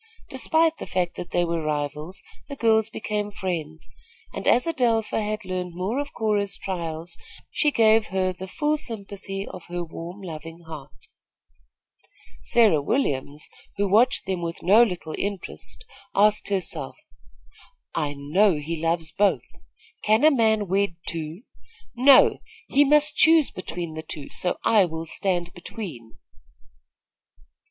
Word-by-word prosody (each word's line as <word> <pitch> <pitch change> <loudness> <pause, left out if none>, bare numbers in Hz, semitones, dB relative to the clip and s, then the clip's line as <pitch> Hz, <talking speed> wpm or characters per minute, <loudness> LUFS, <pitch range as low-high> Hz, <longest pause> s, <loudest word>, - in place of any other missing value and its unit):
Despite 320 +5 +2
the - - -6
fact 180 -2 -1
that 175 - -6
they 175 0 +1
were 170 -1 -1
rivals, 150 +4 -3 0.3
the 280 - -5
girls 220 -3 +3
became 210 -1 -3
friends, 165 -6 -4 0.5
and - - -5
as 245 - +5
Adelpha 235 -9 +1
had 215 0 -3
learned 180 -1 -4
more 195 +9 -2
of 285 0 -4
Cora's 205 -3 0
trials, 170 -3 -5 0.4
she 300 - +2
gave 225 -4 +4
her 185 -1 0
the 190 +1 -8
full 300 +9 0
sympathy 200 -5 -6
of 180 -2 -10
her 175 0 -3
warm, 170 +4 -8
loving 165 -1 -8
heart. 160 -4 -11 1.4
Sarah 215 -11 +4
Williams, 145 - -1 0.3
who 200 0 +1
watched 230 +6 +3
them 190 -2 -2
with 170 0 -5
no 205 +6 +6
little 180 -8 0
interest, 200 - -5 0.3
asked 210 +1 +3
herself: 195 -3 -3 1.0
"I 150 -3 -2
know 170 +7 +3
he 155 +2 -4
loves 165 -1 0
both. 205 -1 +2 0.6
Can 215 +4 +3
a 310 - +7
man 220 -5 +2
wed 195 -1 +1
two? 165 +4 -4 0.5
No; 260 +2 +6 0.3
he 285 - +4
must 300 +1 +4
choose 320 -3 +6
between 175 -3 -5
the 160 - -5
two, 155 -3 -7
so 180 - 0
I 215 -3 +5
will 160 -2 -4
stand 175 0 -1
between." 165 - -8
190 Hz, 140 wpm, -24 LUFS, 165-220 Hz, 1.4 s, a